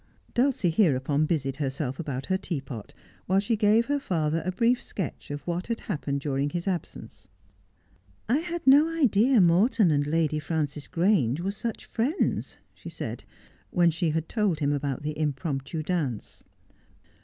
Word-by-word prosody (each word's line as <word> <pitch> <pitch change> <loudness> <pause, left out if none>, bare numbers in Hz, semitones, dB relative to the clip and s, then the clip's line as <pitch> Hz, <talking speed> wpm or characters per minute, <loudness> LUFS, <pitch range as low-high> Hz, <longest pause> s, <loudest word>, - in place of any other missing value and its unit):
Dulcie 240 -8 +2
hereupon 150 -4 +2
busied 135 -5 -1
herself 135 -2 -3
about 135 -5 -4
her 190 - +1
teapot, 135 - -5 0.4
while 190 +2 +3
she 210 +3 +1
gave 215 +2 +4
her 285 +2 0
father 165 - -1
a 185 - -1
brief 235 +6 +2
sketch 185 -8 -6
of 145 0 -6
what 175 +1 -3
had 230 -1 -3
happened 140 -7 -3
during 140 0 -1
his 175 +4 -4
absence. 175 - -5 0.5
' 90 +2 -36 0.3
I 240 +5 +3
had 340 +1 -4
no 285 +4 +7
idea 260 -6 +3
Morton 185 +2 +4
and 145 -1 +1
Lady 155 -1 +1
Frances 150 -2 -3
Grange 165 - +2
were 195 +3 -1
such 225 +2 -5
friends,' 260 - -1 0.2
she - - -10
said, - - -6 0.4
when 175 -2 +3
she 170 +1 0
had 160 +1 -1
told 205 -8 0
him 145 -1 +1
about 140 -1 -2
the 150 0 -3
impromptu 145 0 -2
dance. 150 - -3
165 Hz, 160 wpm, -27 LUFS, 145-210 Hz, 0.5 s, no